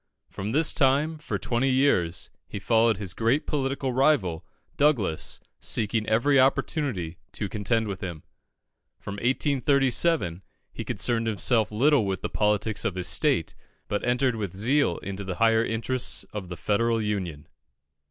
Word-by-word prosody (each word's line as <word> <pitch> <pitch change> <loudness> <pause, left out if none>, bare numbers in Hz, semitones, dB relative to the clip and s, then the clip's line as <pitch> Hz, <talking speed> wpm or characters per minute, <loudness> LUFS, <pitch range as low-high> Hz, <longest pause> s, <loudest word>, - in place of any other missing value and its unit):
From 100 +3 -4
this 155 +5 +3
time, 150 +3 +2
for 150 - -3
twenty 120 +3 0
years, 130 -11 +1 0.2
he - - -6
followed 110 +1 +2
his 95 -3 -3
great 115 +7 +1
political 135 -2 -1
rival, 120 - +2 0.3
Douglas, 120 - +1 0.2
seeking 110 0 -1
every 130 +6 +3
opportunity 130 - 0
to 105 - -3
contend 110 +2 0
with 95 -2 -5
him. 85 -5 -6 0.7
From 100 0 -7
1837 135 - +1 0.3
he - - -5
concerned 115 -1 -1
himself 110 -1 +1
little 125 0 +3
with 95 -1 -3
the - - -2
politics 105 0 0
of 110 -6 -1
his 90 -1 -2
state, - - +1 0.3
but 105 - -2
entered 125 0 +1
with 100 -4 -5
zeal 120 - +2
into 100 +1 -5
the 95 -2 -4
higher 115 +2 +3
interests 115 +3 -1
of 100 -4 -6
the 90 - -6
Federal 115 +7 +1
Union. 95 -9 -3
115 Hz, 145 wpm, -26 LUFS, 100-135 Hz, 0.7 s, this